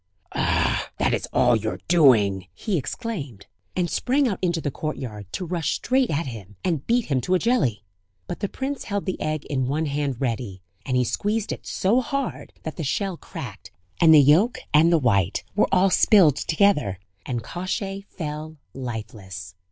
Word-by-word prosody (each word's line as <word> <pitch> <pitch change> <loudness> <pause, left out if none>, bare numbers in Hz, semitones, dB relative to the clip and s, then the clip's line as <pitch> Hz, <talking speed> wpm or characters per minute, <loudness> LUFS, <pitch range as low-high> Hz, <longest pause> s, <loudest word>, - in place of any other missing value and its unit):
"Ah! - - +1
that - - +1
is - - -1
all 120 - +4
your 110 0 -2
doing!" 110 - +4
he 205 - -2
exclaimed; 145 - -4 0.3
and 180 -1 +1
sprang 265 - +1
out 200 -6 -2
into 175 -2 +1
the 145 -3 -2
courtyard, 120 - -5
to 185 - -4
rush 165 -3 -1
straight 260 0 +1
at 155 +3 -1
him, 105 -6 -8
and 160 -6 -1
beat 240 0 +2
him 135 -4 0
to 185 +9 +1
a - - +5
jelly! 155 - +1 0.4
But 175 - -6
the 200 - -2
prince 275 +1 -4
held 200 -1 -2
the 185 - -3
egg 155 -1 -2
in 130 -3 -1
one 150 +4 0
hand 140 -3 -2
ready; 115 -7 -3 0.2
and 130 -1 +1
he 125 - +3
squeezed 210 - -1
it - - -6
so 220 +7 +2
hard, 275 +1 -3
that 160 - -6
the 165 - -3
shell 190 +6 -1
cracked 110 - -9 0.3
and 165 -2 +7
the 155 - +9
yolk 160 - +5 0.2
and 160 +3 +6
the 170 - +5
white 100 - +1
were 210 - +3
all 190 0 +4
spilled 180 -10 +6
together... 160 - +2 0.3
and 120 -3 -2
Kosciey 195 - -4
fell 155 -1 -6 0.2
lifeless! 105 -7 -7
155 Hz, 180 wpm, -24 LUFS, 125-195 Hz, 0.4 s, the